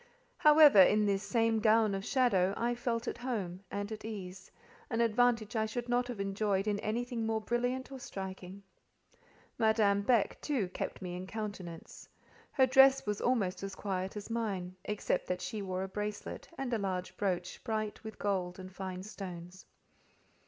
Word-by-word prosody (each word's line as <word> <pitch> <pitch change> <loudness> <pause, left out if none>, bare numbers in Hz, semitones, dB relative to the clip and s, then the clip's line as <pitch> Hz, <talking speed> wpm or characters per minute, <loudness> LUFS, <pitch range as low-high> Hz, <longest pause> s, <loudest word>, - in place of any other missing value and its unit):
However, 300 - +8
in 210 +3 +5
this 200 -1 +1
same 225 -1 +1
gown 215 -1 +4
of 195 0 -3
shadow, 200 -7 +2
I 240 +1 +1
felt 235 -1 -2
at - - -3
home 210 -8 -3
and 205 +1 -4
at 215 0 -6
ease; 190 -4 -7 0.4
an 230 - -1
advantage 230 -1 +2
I 220 -1 +1
should 240 +2 -4
not 245 0 +1
have 245 -4 -6
enjoyed 195 0 0
in 205 -1 0
anything 235 +2 -2
more 220 0 0
brilliant 245 +4 -2
or 265 - -7
striking. 190 -2 -7 1.0
Madame 220 -3 +3
Beck, 225 0 +2
too, 250 -11 -1
kept 185 - -5
me 180 -1 -4
in 180 +1 -6
countenance; 200 -6 -7 0.4
her 265 - +5
dress 270 +1 +6
was 210 -1 -2
almost 215 -8 +1
as 195 0 -5
quiet 190 0 -3
as 210 +2 -7
mine, 195 -6 -2
except 210 -3 -1
that 180 0 -1
she 185 +4 -4
wore 185 -1 -3
a - - -3
bracelet, 210 +2 -5
and 265 -3 -3
a 230 - +1
large 185 -2 -3
brooch 185 -3 -2
bright 215 -2 -3
with 220 -1 -8
gold 185 -3 -1
and 185 0 -9
fine 185 -1 -5
stones. 185 -3 -8
210 Hz, 170 wpm, -32 LUFS, 190-235 Hz, 1.0 s, However